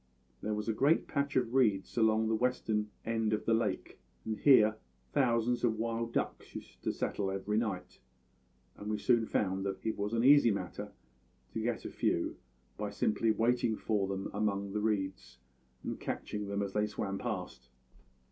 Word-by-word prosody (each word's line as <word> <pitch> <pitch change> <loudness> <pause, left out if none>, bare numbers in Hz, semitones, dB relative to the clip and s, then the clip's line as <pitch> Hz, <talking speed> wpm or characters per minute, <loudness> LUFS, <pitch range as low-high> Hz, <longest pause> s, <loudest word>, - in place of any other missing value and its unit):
There 105 0 -1
was 105 +1 -4
a 115 - +1
great 140 +8 +3
patch 140 -1 -1
of 125 -2 +1
reeds 105 -8 +2
along 110 -1 +3
the 110 - +1
western 110 -3 0 0.2
end 115 -1 0
of 105 - -1
the 115 - +3
lake, 115 +1 -1 0.3
and 110 - -1
here 110 -6 +6 0.4
thousands 120 -1 +2
of 115 -2 +2
wild 115 +1 -2
duck - - -1
used - - -9
to - - 0
settle 100 -2 -2
every 100 +2 0
night; 105 -6 -4 0.8
and 105 - -6
we 105 - 0
soon 115 +1 +2
found 95 -1 0
that 95 +2 -5
it 110 - -1
was 105 +2 -1
an 115 0 +2
easy 140 -2 +7
matter 100 -4 -3 0.6
to - - -2
get - - -2
a - - -4
few - - 0 0.4
by - - -2
simply 110 +1 +1
waiting 115 +1 +2
for 105 -3 0
them 95 0 -3
among 100 -1 -1
the 105 - -1
reeds 95 - -2 0.5
and - - -4
catching 105 -1 -4
them 100 0 -1
as 100 -1 -4
they 105 0 +1
swam 100 -2 -3
past. 90 - -5
110 Hz, 175 wpm, -32 LUFS, 100-115 Hz, 0.8 s, easy